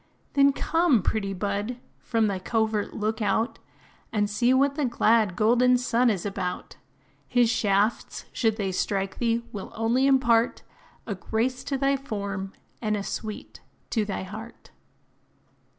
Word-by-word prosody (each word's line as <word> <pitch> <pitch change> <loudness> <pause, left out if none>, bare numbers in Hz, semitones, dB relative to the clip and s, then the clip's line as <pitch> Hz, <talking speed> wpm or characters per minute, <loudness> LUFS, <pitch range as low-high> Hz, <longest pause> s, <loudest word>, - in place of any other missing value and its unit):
Then 280 0 +5
come, 315 - +2
pretty 200 -3 -1
bud; 205 +5 -2 0.2
from 225 -2 0
thy 200 -3 -1
covert 220 +1 -1
look 215 +1 -2
out, 220 +3 0 0.5
And 205 -1 +1
see 240 +4 +2
what 275 +2 +3
the 290 -1 -1
glad, 225 -5 +2
golden 245 +4 +4
sun 245 0 +2
is 200 -4 -1
about: 190 -3 -4 0.5
His 245 -2 +3
shafts, 210 -1 0
should 225 -3 +1
they 195 -3 -1
strike 195 +1 -2
thee, 235 0 0
will 200 -2 -7
only 235 +4 +2
impart 240 -4 +3 0.4
A 220 - -3
grace 235 +6 -2
to 275 - -1
thy 275 +1 +2
form, 200 -7 -4 0.3
and 215 -2 0
a 200 - -3
sweet 215 +1 -6 0.3
to 220 - +1
thy 200 -2 -4
heart. 220 +5 -10
220 Hz, 145 wpm, -26 LUFS, 205-245 Hz, 0.5 s, Then